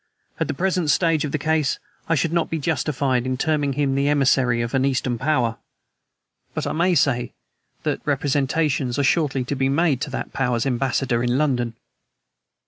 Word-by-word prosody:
At - - 0
the - - -3
present 180 -1 0
stage 165 -2 +2
of 145 - -4
the - - 0
case 155 -1 0 0.3
I 165 - +3
should 165 +2 0
not 170 -1 +1
be 165 - -1
justified 140 -5 0
in 130 0 -1
terming 145 -1 0
him 140 -1 0
the 140 +1 +1
emissary 130 -4 +3
of 115 - -5
an 135 -1 +2
Eastern 130 -3 0
Power, 130 -6 +1 1.0
but - - -2
I - - -1
may 175 +3 +2
say 125 -5 +1 0.5
that - - -1
representations 140 -2 0
are 140 - +1
shortly 140 -3 +1
to 135 +3 -3
be 135 0 +1
made 145 -2 +2
to - - -2
that 135 - -5
Power's 125 -3 0
ambassador 130 -1 0
in 120 +1 +1
London." 125 -6 0
140 Hz, 180 wpm, -22 LUFS, 130-155 Hz, 1.0 s, I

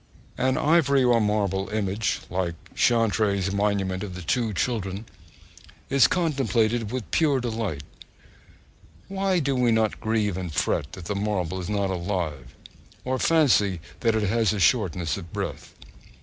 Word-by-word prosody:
An 130 +1 +2
ivory 140 -4 +3
or 120 -2 +4
marble 100 -2 0
image, 105 0 -1
like 90 -2 -1 0.2
Chantry's 105 -4 +2
monument 100 -2 0
of 95 -3 -6
the 90 - -7
two 115 +6 0
children, 100 -1 -2 0.9
is 140 -1 +6
contemplated 120 - 0
with 125 -4 -5
pure 145 -5 +3
delight. 110 - -3 1.3
Why 195 -1 0
do 140 -4 0
we 125 -2 +3
not 110 -1 +1
grieve 110 -4 0
and 90 -3 -4
fret 70 +1 -1
that 90 - -9
the 105 - -2
marble 100 -3 -2
is 90 - -5
not 100 -2 0
alive, 85 -8 -3 0.5
or 130 0 -1
fancy 115 - +3 0.2
that 115 -2 +2
it 110 - +1
has 110 +1 +2
a 105 - -3
shortness 90 -6 +1
of 85 -5 -9
breath? - - -5
105 Hz, 145 wpm, -25 LUFS, 95-120 Hz, 1.3 s, is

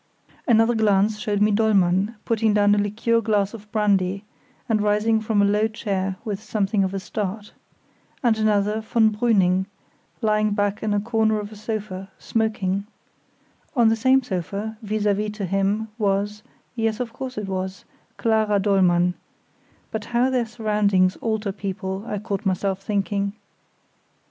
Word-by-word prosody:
Another 225 0 +4
glance 210 -1 +2
showed 210 -2 -1
me 210 - +3
Dollmann 200 -1 +2
putting 225 -2 +1
down 205 0 +4
a 205 - +3
liqueur 225 +3 +1
glass 205 -2 +1
of 210 -2 -11
brandy, 200 -2 +1 0.4
and 220 -2 +1
rising 210 +2 +2
from 215 -2 +2
a - - +5
low 210 +2 +2
chair 195 -3 -2
with 205 -2 -3
something 210 -2 0
of 190 +1 -2
a - - -1
start; 205 +1 -5 0.7
and 235 -3 +4
another, 210 0 +1
von 220 0 +2
Brüning, 190 -5 +2 0.5
lying 215 -2 +1
back 205 -1 0
in 210 -1 0
a - - +2
corner 220 0 +1
of 205 0 -7
a - - -10
sofa, 210 -3 -5
smoking; 205 -3 -1 0.9
on 235 -3 +5
the 225 - +3
same 260 +4 +3
sofa, 200 +1 -4
vis 215 -1 -2
à 205 -1 +3
vis 210 +1 -2
to 210 -2 -4
him, 195 +4 0
was—yes, 210 +2 -2
of 240 -2 -4
course 260 -1 -6
it 210 -2 -3
was—Clara 205 +3 -2
Dollmann; 180 -3 +3 0.8
but 220 -2 -4
how 245 +2 +1
their 245 -3 0
surroundings 210 -5 +1
alter 220 -3 -2
people, 190 -1 -4
I 210 - -2
caught 205 0 -4
myself 195 0 -1
thinking. 200 0 -1
210 Hz, 150 wpm, -23 LUFS, 195-220 Hz, 0.9 s, a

